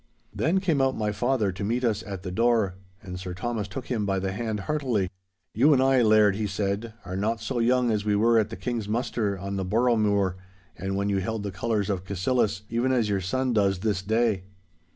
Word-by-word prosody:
Then 160 - +1
came 165 -7 +1
out 135 0 +1
my 105 -1 0
father 110 -1 +1
to 90 +2 -6
meet 120 +5 -1
us 110 -3 +1
at 95 -3 -7
the 90 - -4
door, 115 -2 +2 0.3
and 90 -2 -7
Sir 90 -1 -6
Thomas 110 0 -3
took 130 -2 -6
him 115 -5 -1
by 100 -1 0
the 95 0 -1
hand 110 0 -3
heartily. 120 -8 -1 0.4
'You 140 +7 +5
and 130 -1 +4
I, 135 -1 +4
Laird,' 105 -3 +5
he 110 -1 -1
said, 105 +3 -2
'are 95 +1 -5
not 110 +4 -1
so 120 +3 -3
young 125 0 +3
as 105 -2 0
we 105 -1 +1
were 115 +2 +4
at 110 - 0
the 115 - -6
King's 115 -4 -3
muster 110 -3 -1
on 100 +2 -4
the 95 - -1
Boroughmuir, 105 -3 +2 0.4
and 95 +3 -3
when 100 +1 0
you 100 -1 +1
held 110 +2 -3
the 100 - -3
colours 105 +1 -1
of 95 -3 -2
Cassillis, 100 +2 0
even 120 +3 0
as 120 -5 +2
your 100 -2 0
son 130 +7 -1
does 100 -4 +2
this 105 -3 0
day. 110 -2 +1
105 Hz, 220 wpm, -26 LUFS, 100-120 Hz, 0.4 s, You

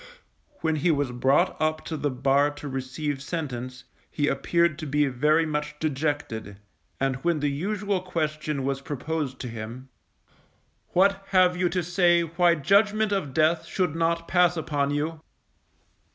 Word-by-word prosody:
When 160 -1 +1
he 155 +4 +1
was 145 -5 +1
brought 130 +3 +2
up 155 0 0
to 160 - -4
the 150 -1 -1
bar 135 +2 +2
to 145 0 -8
receive 135 +2 -3
sentence, 130 -5 -5 0.3
he 145 -1 -1
appeared 170 +2 +1
to 155 - -5
be 145 +1 +2
very 150 +5 +2
much 150 -1 -3
dejected, 140 -9 -2 0.4
and 135 -1 0
when 170 +3 0
the 145 -1 0
usual 200 +5 -1
question 155 -5 -2
was 135 0 -2
proposed 145 -1 -3
to 125 - -4
him: 115 +3 -7 1.1
_What 195 +2 +3
have 185 -2 +4
you 180 0 +1
to 180 0 -1
say 175 0 +3
why 170 +1 +3
judgment 205 +6 +3
of 195 -9 -1
death 160 +4 +2
should 180 -5 -1
not 165 0 0
pass 175 -1 +3
upon 145 -3 -1
you? 155 +2 -2
155 Hz, 150 wpm, -26 LUFS, 140-170 Hz, 1.1 s, have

